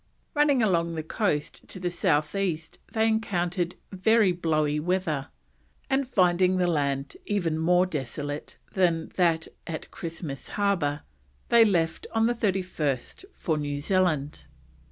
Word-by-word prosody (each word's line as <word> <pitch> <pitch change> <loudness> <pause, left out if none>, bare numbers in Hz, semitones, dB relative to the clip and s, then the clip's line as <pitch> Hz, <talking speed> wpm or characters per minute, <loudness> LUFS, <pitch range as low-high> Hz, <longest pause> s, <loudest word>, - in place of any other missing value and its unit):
Running 290 -4 +3
along 170 -5 +1
the 160 - -3
coast 155 -3 -2
to 185 - -7
the 180 -1 -2
south 150 -3 +1
east 175 -5 -2
they 220 0 +2
encountered 180 -5 0 0.2
very 205 +1 +4
blowy 155 -4 +1
weather, 160 -4 -1 0.6
and 270 0 +2
finding 185 -4 +3
the 180 - +2
land 140 -4 0
even 170 -6 0
more 180 +3 +4
desolate 145 -2 -4 0.2
than 170 -4 +1
that 165 -3 +2 0.2
at 160 -2 -6
Christmas 165 -5 -6
Harbour, 175 -8 +1 0.5
they 235 -1 +7
left 170 -7 +1
on 225 0 +4
the 240 - +3
31st 185 - -2
for 160 -4 -1
New 145 -1 -2
Zealand. 155 -3 0
175 Hz, 135 wpm, -27 LUFS, 155-195 Hz, 0.6 s, they